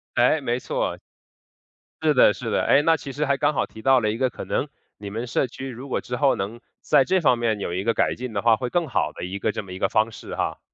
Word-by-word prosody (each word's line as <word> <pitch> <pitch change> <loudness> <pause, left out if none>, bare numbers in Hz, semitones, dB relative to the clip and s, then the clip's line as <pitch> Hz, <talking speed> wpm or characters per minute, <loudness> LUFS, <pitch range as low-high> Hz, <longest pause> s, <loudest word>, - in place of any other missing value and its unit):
诶， 125 +6 +4
没 120 -2 -1
错， - - -2 1.0
是 155 -1 +3
的， 125 - +6
是 90 - -5
的， - - +2
诶， 145 - +5
那 165 +1 +3
其 140 -1 -7
实 150 +3 -1
还 140 -1 +1
刚 150 - +2
好 - - 0
提 110 - -13
到 135 +1 +5
了 105 -2 0
一 110 - -4
个 130 0 +1
可 - - -8
能 - - -1 0.3
你 100 -1 -7
们 115 +4 -4
社 125 - 0
区 135 +2 -7
如 130 +2 -9
果 - - -1
之 125 - -5
后 140 +1 +3
能 105 +5 -4 0.2
在 145 -3 +4
这 190 +7 +2
方 125 -5 +4
面 110 -3 0
有 85 - -3
一 95 +2 -2
个 115 +2 +1
改 - - +1
进 125 -2 -6
的 100 - -1
话， 115 -1 +5
会 125 +3 -3
更 175 +2 0
好 130 - 0
的 - - -8
一 95 +3 -4
个 110 - 0
这 105 - -5
么 95 - -12
一 95 - -7
个 95 - +1
方 110 +1 +2
式 - - -8
哈。 - - -2
120 Hz, 300 characters per minute, -24 LUFS, 110-135 Hz, 1.0 s, 的